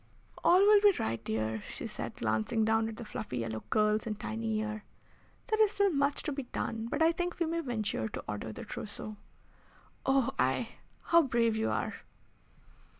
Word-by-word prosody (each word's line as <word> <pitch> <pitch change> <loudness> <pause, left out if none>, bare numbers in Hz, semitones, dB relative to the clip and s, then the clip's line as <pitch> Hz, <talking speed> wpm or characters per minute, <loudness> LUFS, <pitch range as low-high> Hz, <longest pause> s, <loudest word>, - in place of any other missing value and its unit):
"All 360 +2 +6
will 410 0 +7
be 410 -1 +7
right, 115 0 -2
dear," 110 0 -2
said - - -5
she, - - -15
glancing 110 - +1
down 225 0 +2
at 220 - -8
the 235 - -7
fluffy 210 -10 -5
yellow 110 -2 -3
curls 215 +1 +2
and 215 -1 -3
tiny 220 0 -2
ear. 215 0 -4 0.6
"There 435 -1 +1
is 425 0 +2
still 400 -1 +3
much 280 -1 +1
to - - -2
be 280 0 -3
done, 225 -3 -4
but 295 +4 +1
I 325 - +6
think 350 +1 -3
we 340 - +1
may 330 +1 -1
venture 220 - -1
to - - -6
order 105 +1 -4
the - - -8
trousseau." 215 0 -6 0.9
"Oh 270 -2 +3
I 130 - +1 0.3
how 335 0 +6
brave 235 -5 +2
you 220 0 0
are!" - - -1
225 Hz, 185 wpm, -31 LUFS, 205-305 Hz, 0.9 s, will